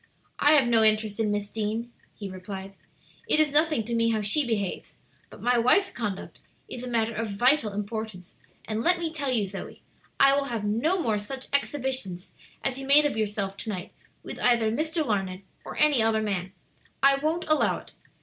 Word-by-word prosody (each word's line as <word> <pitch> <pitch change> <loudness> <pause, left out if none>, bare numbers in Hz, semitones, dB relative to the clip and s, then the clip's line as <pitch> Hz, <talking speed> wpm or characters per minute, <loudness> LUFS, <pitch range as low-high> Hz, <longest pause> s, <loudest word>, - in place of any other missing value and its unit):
"I 295 - +6
have 280 -5 +5
no 230 -2 +4
interest 215 0 +2
in 220 -2 +1
Miss 205 0 -1
Deane," 220 +3 -3 0.2
he 205 - -6
replied; 190 +1 -8 0.5
"it - - +2
is 305 -2 +3
nothing 305 -4 +3
to 235 - -4
me 230 0 +2
how 220 -1 0
she 215 +9 +2
behaves, 205 -5 -3 0.3
but - - -13
my 245 0 +3
wife's 380 +12 +3
conduct 210 -5 -5 0.3
is 250 - -7
a - - -5
matter 230 -2 0
of 225 0 -3
vital 240 +3 +2
importance; 205 -2 -5 0.3
and 220 0 -2
let 355 +7 +3
me 330 -2 -3
tell 280 -4 -2
you, 225 -5 +1
Zoe, 195 0 -8 0.4
I 275 0 +6
will 280 0 0
have 235 -5 -3
no 235 - +1
more 225 -9 0
such 265 +6 -7
exhibitions 260 -10 -2 0.3
as 265 0 -1
you 270 - -7
made 295 +2 +6
of 295 - 0
yourself 205 -2 -2
to 220 - -6
night 185 -3 -5 0.3
with - - -8
either 235 -3 +3
Mr. 315 +5 -1
Larned 195 -4 -2 0.2
or - - -8
any 295 -5 +4
other 220 0 +2
man. 190 -3 -2 0.5
I 275 0 +6
won't 320 +4 -1
allow 310 0 +2
it. - - -14
230 Hz, 195 wpm, -26 LUFS, 205-275 Hz, 0.5 s, I